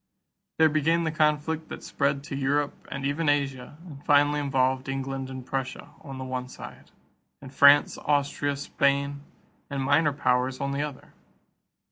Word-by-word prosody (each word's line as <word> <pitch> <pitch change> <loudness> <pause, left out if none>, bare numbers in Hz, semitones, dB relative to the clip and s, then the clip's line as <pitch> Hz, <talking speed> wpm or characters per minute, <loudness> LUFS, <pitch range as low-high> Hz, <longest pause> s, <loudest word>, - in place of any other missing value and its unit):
There 160 - +6
began 155 +2 +1
the 160 - -1
conflict 155 +1 0
that - - -8
spread 140 0 -1
to 140 - -6
Europe 140 +1 -1
and 135 0 -4
even 145 +2 0
Asia 140 -1 -1
and 145 -5 -11
finally 145 0 +3
involved 130 -2 0
England 135 0 -4
and 130 -1 -8
Prussia, 130 0 -4
on 135 -4 -9
the 130 - -5
one 130 -1 -4
side, - - -11 0.5
and 135 -1 -12
France, 140 +2 +6
Austria, 145 -1 0
Spain, 140 0 0 0.5
and 140 -2 -3
minor 145 +3 +3
powers 130 -2 0
on 140 0 -2
the 140 +1 -2
other. 145 -3 -7
140 Hz, 155 wpm, -26 LUFS, 135-145 Hz, 0.5 s, There